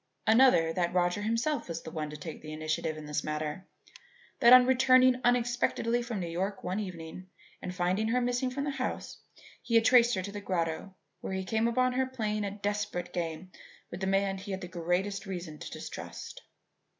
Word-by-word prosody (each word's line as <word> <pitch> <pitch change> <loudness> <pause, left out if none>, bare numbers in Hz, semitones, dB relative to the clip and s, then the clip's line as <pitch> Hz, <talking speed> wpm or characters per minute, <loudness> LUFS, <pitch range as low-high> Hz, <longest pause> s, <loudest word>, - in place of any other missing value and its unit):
Another, 220 -9 +5
that 175 0 -1
Roger 175 +2 +2
himself 230 +8 -1
was 165 -1 -5
the 160 - -8
one 155 -2 -4
to 150 - -7
take 155 +2 -8
the 155 - -8
initiative 155 0 -2
in 155 - -8
this 150 -1 -2
matter: 155 +4 -4 0.7
That, 235 -2 +7
on 250 0 +10
returning 255 0 +5
unexpectedly 240 -1 +1
from 235 -3 -4
New 175 - -3
York 190 +4 -3
one 185 +3 -2
evening 185 -2 -7 0.3
and 180 - -4
finding 180 +4 0
her 240 +3 +2
missing 245 +1 0
from 275 +2 -3
the 285 - -1
house, 280 - -4 0.4
he 230 - -2
had 225 0 +5
traced 240 -1 +6
her 185 - -2
to 200 - -6
the 205 0 -6
grotto 180 0 -2 0.2
where - - -5
he 190 0 -2
came 220 +4 +1
upon 255 +2 +2
her 260 +1 +1
playing 215 -5 -2
a - - -1
desperate 205 -3 -3
game 170 +1 -4 0.4
with 175 - -6
the 190 - -2
one - - +1
man 195 0 +1
he 200 +2 -9
had 190 -1 -3
the 180 - -6
greatest 185 +4 -2
reason 175 -5 -6
to - - -7
distrust. - - -8
195 Hz, 200 wpm, -30 LUFS, 175-235 Hz, 0.7 s, on